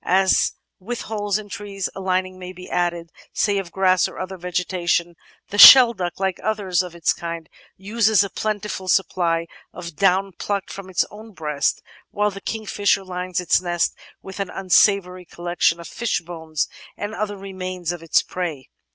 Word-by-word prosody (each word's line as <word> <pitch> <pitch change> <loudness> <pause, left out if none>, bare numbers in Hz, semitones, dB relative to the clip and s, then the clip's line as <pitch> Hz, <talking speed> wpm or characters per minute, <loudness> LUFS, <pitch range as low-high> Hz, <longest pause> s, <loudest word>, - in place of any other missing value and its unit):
As 190 +1 +3 0.3
with 235 +6 -5
holes 205 -2 -2
in 215 -1 -8
trees, 200 -1 -5
a - - -8
lining 185 0 -1
may 180 0 -8
be 180 0 -11
added, 170 -1 -2 0.2
say 200 -2 +1
of 180 -3 -7
grass 185 -1 +3
or - - -11
other 185 +1 -5
vegetation; 175 -1 -1 0.3
the 205 - -3
Shelduck, 230 -11 +9
like 190 -1 -1
others 200 -5 0
of 180 -2 -8
its 170 -2 +1
kind, 170 -1 -6 0.3
uses 210 +1 +2
a 200 - -5
plentiful 210 -3 -3
supply 170 -3 +1 0.3
of 170 -3 -9
down 195 +3 +2
plucked 200 +1 -4
from 195 -1 -9
its 185 - +1
own 215 +1 -12
breast, 150 -4 -1 0.3
while 210 0 0
the 195 0 -9
King 220 +1 -4
fisher 200 -1 +1
lines 180 -1 -3
its 180 0 +2
nest 175 -1 0 0.3
with 190 +1 -9
an 195 -2 -2
unsavory 185 -1 +2
collection 175 0 0
of 170 - -9
fishbones 165 -8 -3 0.3
and 205 +1 -4
other 210 -2 -3
remains 185 -3 -5
of 175 -2 -6
its 165 - +2
prey. 165 -8 -5
185 Hz, 170 wpm, -22 LUFS, 175-200 Hz, 0.3 s, Shelduck